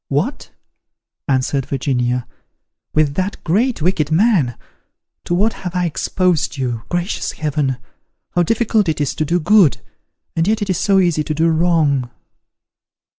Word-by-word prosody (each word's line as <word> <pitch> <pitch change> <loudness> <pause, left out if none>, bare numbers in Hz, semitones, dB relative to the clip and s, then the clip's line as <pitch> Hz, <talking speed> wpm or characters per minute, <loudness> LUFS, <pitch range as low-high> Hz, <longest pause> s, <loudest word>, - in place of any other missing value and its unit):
"What!" - - -2 0.8
answered 135 0 0
Virginia, 125 -3 -1 0.7
"with 155 -2 +3
that 185 +5 -2
great 215 - +1
wicked 165 -4 +1
man? 165 - +2 0.7
To 175 - 0
what 210 +5 +2
have 180 -1 -5
I 180 0 +1
exposed 175 -1 0
you! 120 -4 -2
Gracious 175 +2 -2
heaven! 145 -4 -1 0.5
how 175 - +2
difficult 215 0 +1
it 155 - -1
is 145 - 0
to 155 - -2
do 175 +4 +1
good! 185 -2 +4 0.6
and 165 +2 +1
yet 215 0 +1
it 200 - -1
is 180 - -1
so 195 -1 +3
easy 175 -5 +2
to 155 - -3
do 165 +2 +2
wrong." 160 -6 +2
165 Hz, 145 wpm, -18 LUFS, 140-185 Hz, 0.8 s, good